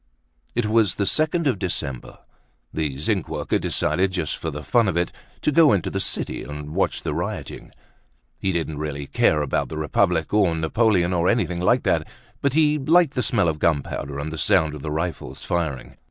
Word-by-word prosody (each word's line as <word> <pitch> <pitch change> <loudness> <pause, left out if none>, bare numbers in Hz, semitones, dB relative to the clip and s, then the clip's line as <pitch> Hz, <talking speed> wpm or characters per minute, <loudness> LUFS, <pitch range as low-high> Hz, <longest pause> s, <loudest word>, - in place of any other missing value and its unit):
It 120 -2 +1
was 110 -3 +2
the 100 - 0
second 155 - +1
of 135 - +1
December. 70 -9 -4 0.6
The 75 -4 -2
zinc 75 - -1
worker - - -1
decided, 90 +6 +1
just 85 -5 -1
for 80 - -4
the 75 0 -6
fun 115 +3 +3
of 95 - 0
it, 85 0 0 0.3
to 150 - +2
go 155 -1 +6
into 95 -5 0
the - - -2
city - - -2
and 75 +1 -7
watch - - 0
the - - -2
rioting. - - -5 0.7
He 95 - 0
didn't 80 -4 -3
really 75 -2 -4
care 75 +2 +2
about 70 - -1
the 80 - -6
Republic, 80 +2 +1
or 100 -6 +3
Napoleon 90 +2 +2
or 85 0 +1
anything 100 -7 0
like 90 - +2
that, - - +1 0.3
but 140 -2 +1
he 150 -1 +3
liked 160 +2 +4
the 125 - 0
smell 105 -7 +2
of 80 -2 -1
gunpowder 70 -3 -1
and 75 +2 -4
the 80 - -5
sound 80 -2 +3
of 75 - -8
the 75 - -4
rifles 80 -4 -4
firing. 80 -7 -3
85 Hz, 195 wpm, -23 LUFS, 75-110 Hz, 0.7 s, go